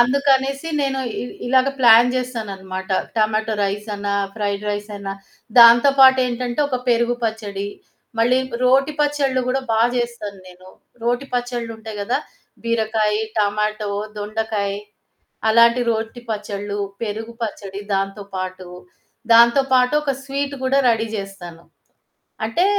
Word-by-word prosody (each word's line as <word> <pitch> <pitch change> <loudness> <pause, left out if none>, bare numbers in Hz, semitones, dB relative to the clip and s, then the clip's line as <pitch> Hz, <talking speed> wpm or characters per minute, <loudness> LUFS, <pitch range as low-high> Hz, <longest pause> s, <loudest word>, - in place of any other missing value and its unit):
అందుకనేసి 275 +3 +2
నేను 270 -1 -1 0.2
ఇ - - -3 0.2
ఇలాగ 260 +2 +3
ప్లాన్ 235 -1 +7
చేస్తాననమాట. 195 -7 -5 0.3
టమాటో 220 0 +1
రైస్ 205 +2 -3
అన్నా 200 0 -2 0.2
ఫ్రైడ్ 205 -1 -2
రైస్ 205 +1 -4
అన్నా 195 -1 -5 0.5
దాంతో 235 +3 +8
పాటు 265 0 +8
ఏంటంటే 245 +1 -3
ఒక 260 - -1
పెరుగు 235 0 +2
పచ్చడి. 205 -3 -3 0.5
మళ్ళీ 245 +3 +3 0.3
రోటి 270 +4 +3
పచ్చళ్ళు 285 -3 +1
కూడా 265 +1 0
బా 220 - +2 0.2
చేస్తాను 235 -4 -4
నేను. 185 +1 -15 0.3
రోటి 245 +3 -1
పచ్చళ్ళు 245 -1 -2
ఉంటాయి 220 -1 -9
కదా! 220 +5 0 0.4
బీరకాయ, 220 -2 0 0.2
టమాటో, 210 0 0 0.3
దొండకాయి. 210 -1 -3 0.7
అలాంటి 235 +2 +5
రోటి 225 +2 -4
పచ్చడ్లు, 205 -1 -4 0.2
పెరుగు 225 +1 -4
పచ్చడి, 200 -2 -6
దాంతో 195 +1 -2
పాటు 185 0 -5 0.6
దాంతో 235 +3 +7
పాటు 250 +1 +4
ఒక 290 -2 0
స్వీటు 280 +1 -3
కూడా 265 +1 +2
రెడీ 225 -1 +1
చేస్తాను. 185 -4 -8 0.8
అంటే 225 +11 +1
225 Hz, 125 wpm, -20 LUFS, 205-250 Hz, 0.8 s, దాంతో